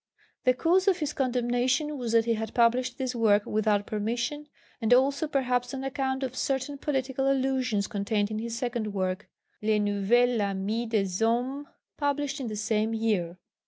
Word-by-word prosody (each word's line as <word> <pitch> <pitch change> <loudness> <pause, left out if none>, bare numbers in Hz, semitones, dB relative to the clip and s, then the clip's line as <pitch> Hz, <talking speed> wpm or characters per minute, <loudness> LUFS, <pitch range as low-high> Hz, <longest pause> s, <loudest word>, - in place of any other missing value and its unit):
The 255 0 +4
cause 360 +7 +2
of 380 -3 +4
his 300 -4 -2
condemnation 255 +3 0
was 240 -4 -3
that 230 -1 +4
he 230 - +2
had 220 0 -4
published 245 +1 +2
this 260 -1 -2
work 215 -3 +3
without 210 -1 +1
permission, 240 +8 -2 0.3
and 225 +1 0
also 280 +4 +2
perhaps 250 -3 0
on 265 - -5
account 270 -1 -2
of 255 -1 -4
certain 270 +1 -2
political 270 -1 0
allusions 260 -6 0
contained 205 0 -1
in 215 - -2
his 230 +1 -4
second 230 -4 -3
work, 185 +1 -2 0.3
Le 215 0 +2
Nouvel 210 +4 +2
Ami 200 +4 -1
des 215 -3 +1
Hommes, 250 +6 0 0.3
published 285 0 -1
in 260 - -4
the 215 - -4
same 220 +1 0
year. 200 -6 -1
240 Hz, 165 wpm, -28 LUFS, 215-265 Hz, 0.3 s, The